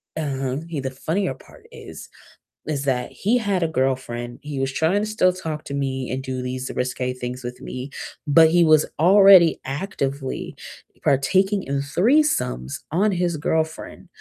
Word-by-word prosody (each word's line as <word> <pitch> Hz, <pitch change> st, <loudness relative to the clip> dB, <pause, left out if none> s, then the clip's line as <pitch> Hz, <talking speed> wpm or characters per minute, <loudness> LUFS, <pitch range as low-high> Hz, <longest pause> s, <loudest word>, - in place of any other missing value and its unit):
Um, 135 Hz, -2 st, -3 dB
he 160 Hz, -4 st, -4 dB
the 130 Hz, -1 st, -3 dB
funnier 160 Hz, +5 st, -2 dB
part -, -, -18 dB
is -, -, -10 dB, 0.6 s
is 145 Hz, -3 st, -3 dB
that 125 Hz, -2 st, -1 dB
he 225 Hz, +5 st, +1 dB
had 200 Hz, -5 st, 0 dB
a 165 Hz, -, +2 dB
girlfriend, 130 Hz, -4 st, -2 dB
he 145 Hz, -2 st, -5 dB
was 135 Hz, 0 st, -1 dB
trying 165 Hz, +8 st, +1 dB
to 210 Hz, -, -1 dB
still 195 Hz, -4 st, +2 dB
talk 160 Hz, -4 st, -5 dB
to 140 Hz, -, -6 dB
me 130 Hz, -2 st, -2 dB
and 130 Hz, +1 st, -3 dB
do 130 Hz, -1 st, -4 dB
these 130 Hz, +1 st, -4 dB
risque 125 Hz, 0 st, -2 dB
things 125 Hz, 0 st, -6 dB
with 125 Hz, 0 st, -6 dB
me, 130 Hz, +2 st, -6 dB, 0.4 s
but 160 Hz, +2 st, +6 dB
he 175 Hz, 0 st, +5 dB
was 155 Hz, -2 st, +5 dB
already 190 Hz, -1 st, +7 dB
actively 140 Hz, -3 st, -4 dB, 0.5 s
partaking 190 Hz, +9 st, +2 dB
in 140 Hz, 0 st, -2 dB
threesomes 150 Hz, -, +1 dB, 0.2 s
on 200 Hz, +6 st, +2 dB
his 175 Hz, -2 st, 0 dB
girlfriend, 160 Hz, +1 st, -3 dB
145 Hz, 160 wpm, -22 LUFS, 130-180 Hz, 0.6 s, already